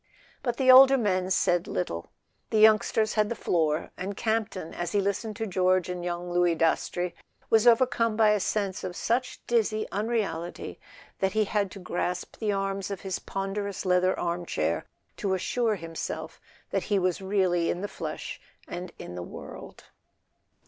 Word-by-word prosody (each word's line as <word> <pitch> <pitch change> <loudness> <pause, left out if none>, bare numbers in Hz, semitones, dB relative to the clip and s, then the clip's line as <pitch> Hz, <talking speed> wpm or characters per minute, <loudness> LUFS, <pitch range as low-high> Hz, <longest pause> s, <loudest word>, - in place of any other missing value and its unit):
But 240 -2 -2
the 260 -1 +6
older 270 +1 +9
men 185 -5 0
said 175 -2 +2
little. 85 -2 -3 0.4
The 220 - +1
youngsters 215 0 +4
had 210 -1 +2
the 235 - -2
floor, 160 -5 0
and 195 +2 -5
Campton, 220 -6 -1
as 175 -1 -4
he 205 - +3
listened 200 +2 -1
to 225 - -3
George 185 -2 +2
and 180 -1 -4
young 175 0 -3
Louis 175 -1 +3
Dastrey, 170 +2 0 0.4
was 225 +1 +5
overcome 230 -2 +4
by 215 -2 +5
a 210 - +2
sense 200 -1 -1
of 180 -1 -4
such 245 +6 -1
dizzy 220 -2 +1
unreality 200 -6 -2 0.4
that 190 -1 +1
he 220 - +3
had 205 -1 0
to 200 - -9
grasp 180 0 -3
the 215 -2 0
arms 195 0 -2
of 200 -2 -5
his 190 -2 -3
ponderous 195 0 -4
leather 185 0 +2
armchair 170 0 -1 0.3
to 195 -3 0
assure 225 +4 0
himself 165 -2 -6 0.3
that 195 - -1
he 205 - +1
was 185 -1 0
really 185 -3 +1
in 175 - -1
the 205 - -2
flesh - - -6 0.3
and 175 0 -6
in 90 - -8
the 90 - -5
world. 85 - -9
195 Hz, 165 wpm, -27 LUFS, 175-215 Hz, 0.4 s, older